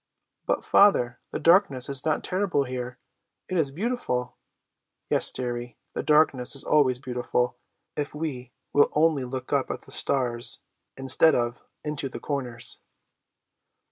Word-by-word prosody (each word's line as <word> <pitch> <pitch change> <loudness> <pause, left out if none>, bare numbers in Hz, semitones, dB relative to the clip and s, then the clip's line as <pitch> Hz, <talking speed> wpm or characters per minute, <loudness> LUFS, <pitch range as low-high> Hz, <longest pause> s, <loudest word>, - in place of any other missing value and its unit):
"But, - - 0
father, 125 -12 +4
the - - -3
darkness 165 -8 +4
is 140 -1 -1
not 155 -1 0
terrible 185 -6 0
here, 125 -1 -5 0.5
it 185 - -3
is 160 -5 +2
beautiful!" 145 - -2 0.8
"Yes, - - +4
dearie; 120 -1 -4 0.2
the - - -2
darkness 150 -4 +3
is 140 - 0
always 135 -5 +3
beautiful, 125 -1 -2 0.4
if 145 0 -3
we 135 -6 -5 0.2
will 145 - +5
only 150 -3 +3
look 130 0 -5
up - - +1
at - - -5
the - - -15
stars, 120 -3 +1 0.4
instead 135 +4 +4
of 120 0 -1 0.2
into 150 -2 -3
the - - -7
corners." 125 -5 -4
135 Hz, 140 wpm, -26 LUFS, 125-150 Hz, 0.8 s, will